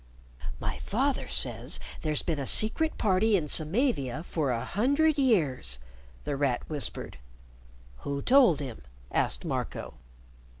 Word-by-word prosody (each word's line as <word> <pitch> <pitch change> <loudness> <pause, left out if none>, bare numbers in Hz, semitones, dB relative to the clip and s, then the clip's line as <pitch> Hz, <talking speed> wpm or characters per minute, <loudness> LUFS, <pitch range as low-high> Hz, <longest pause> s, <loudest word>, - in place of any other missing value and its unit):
"My 105 - -4
father 265 +6 -1
says - - -1 0.2
there's 155 -2 0
been 160 -4 -2
a 135 - -2
Secret 310 +9 +4
Party 205 +1 +2
in 155 -4 -3
Samavia 155 - +2
for 155 -5 -2
a 115 -2 -2
hundred 285 +7 +1
years," 150 - +1 0.5
The 145 - -3
Rat 135 -3 -1
whispered. 145 - -4 0.8
"Who 140 - -4
told 250 - +5
him?" 130 -5 -7 0.3
asked 60 - 0
Marco. - - -4
160 Hz, 125 wpm, -28 LUFS, -, 0.8 s, told